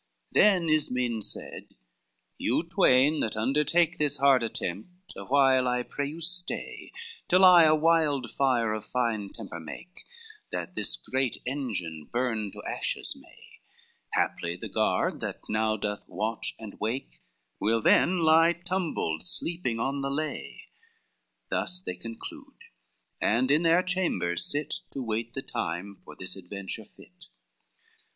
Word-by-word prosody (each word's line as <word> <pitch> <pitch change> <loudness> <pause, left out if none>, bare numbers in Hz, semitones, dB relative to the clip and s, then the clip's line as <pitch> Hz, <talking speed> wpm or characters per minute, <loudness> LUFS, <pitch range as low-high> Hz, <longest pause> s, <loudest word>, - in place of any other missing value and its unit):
XVII - - -48
Then 195 -4 +5
Ismen 125 -7 +1
said, - - -5 0.6
"You - - +1
twain 135 +5 +4
that 110 - -1
undertake 150 +8 +2
This 145 -1 +1
hard 135 -2 +5
attempt, 115 - -5
awhile 130 -2 +3
I 125 0 +1
pray 140 +3 -3
you 155 +3 -7
stay, 175 +2 -3 0.4
Till 185 +2 +6
I 175 -3 +9
a 155 0 +5
wildfire 140 -7 +2
of 110 -1 -4
fine 115 -4 -1
temper 100 -6 -8
make, 175 - -10 0.5
That - - -4
this - - +1
great 130 -2 -1
engine 100 - -4
burn 120 -4 -1
to - - -9
ashes - - -1
may; - - -18 0.5
Haply 85 0 0
the 90 - -7
guard - - +1
that - - -4
now 110 0 +1
doth 105 0 -4
watch 110 +1 -2
and 110 -3 -10
wake, 110 - -4 0.4
Will 115 +2 +2
then 175 +10 +4
lie 165 +1 +6
tumbled 175 - -2
sleeping 170 -9 -2
on 140 +3 -1
the 135 - -1
lay;" 155 +2 -4 0.9
Thus 180 +1 0
they 135 - -5
conclude, 115 +5 -9 0.6
and 125 +5 +2
in 150 +2 +4
their 170 +2 +4
chambers 180 - 0
sit, 145 +1 -1 0.2
To 135 - -3
wait 115 +1 -3
the 135 - -4
time 90 +4 -4
for - - -12
this 90 - -3
adventure 95 +1 -6
fit. - - -18
130 Hz, 140 wpm, -28 LUFS, 110-160 Hz, 0.9 s, I